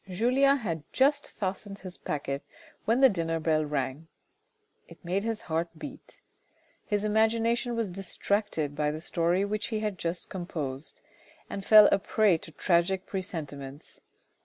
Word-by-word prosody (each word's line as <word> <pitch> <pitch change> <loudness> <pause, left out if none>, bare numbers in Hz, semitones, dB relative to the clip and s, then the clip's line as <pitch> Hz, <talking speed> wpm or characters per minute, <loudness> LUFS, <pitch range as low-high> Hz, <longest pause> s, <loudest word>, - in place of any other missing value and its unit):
Julien 255 +8 +3
had 165 - -3
just 285 +2 +2
fastened 195 0 -4
his 185 -2 -4
packet 140 -4 -3 0.4
when 235 +4 +2
the 270 - +9
dinner 165 -5 -1
bell 155 -1 +2
rang. 145 +1 -3 0.8
It - - -16
made 190 +3 0
his 225 -1 -2
heart 165 +1 -2
beat. - - -10 0.7
His 205 -1 -1
imagination 230 +3 +2
was 225 -5 -1
distracted 195 -4 -1
by 150 0 +1
the 155 +1 -4
story 170 +3 +1
which 210 +1 -2
he 220 -2 -2
had 210 -4 -2
just 170 +1 -3
composed, 155 -6 -5 0.5
and 195 - -4
fell 215 0 +9
a - - +4
prey 200 -3 +3
to 160 - -11
tragic 175 +4 +1
presentiments. 145 -7 -6
185 Hz, 145 wpm, -28 LUFS, 160-215 Hz, 0.8 s, the